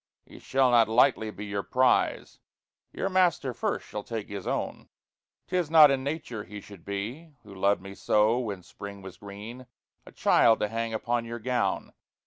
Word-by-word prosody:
He - - -14
shall 130 -1 +2
not 115 -2 +5
lightly 115 -1 +3
be 105 0 -8
your 100 -1 -2
prize 130 +4 +1 0.5
Your - - -2
Master 180 -8 +2
first 120 - -2
shall 105 - -6
take 110 -3 -5
his 100 -2 -6
owne. - - -3 0.6
'Tis 180 -4 -1
not 155 -3 +8
in 135 -1 0
nature 140 -7 -4
he 105 +3 -9
should 100 -4 -14
be 120 +11 -6
(Who 100 -2 -13
loved 100 0 +1
me 100 0 -8
soe 105 +4 +2
when 100 -7 -4
Springe 100 +1 -10
was 95 -1 -10
greene) 105 +6 -10 0.4
A - - -11
childe, 115 -1 +4
to 105 - 0
hange 115 0 -2
upon 120 +1 -1
your 115 +1 -5
gowne! 115 -4 -1
115 Hz, 175 wpm, -27 LUFS, 100-130 Hz, 0.6 s, not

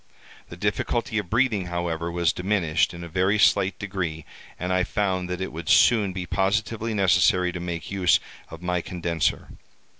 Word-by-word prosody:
The 85 - -9
difficulty 105 +3 -1
of 95 -5 -6
breathing, 110 -5 +1
however, 85 -1 -3
was 85 -2 +1
diminished 90 -4 +1
in 85 0 -9
a - - -6
very 95 +5 +1
slight 95 -2 +3
degree, 90 -6 -4 0.3
and 90 +2 -2
I 90 0 +2
found 95 -2 -1
that 90 0 -4
it 95 - -3
would 80 0 -6
soon 100 +4 +5
be 90 -1 -5
positively 110 +4 -1
necessary 90 -2 +3
to 90 - -6
make 85 0 -5
use 95 -3 +3 0.3
of 80 +1 -11
my 90 -1 0
condenser. 85 -2 -2
90 Hz, 170 wpm, -24 LUFS, 85-100 Hz, 0.3 s, soon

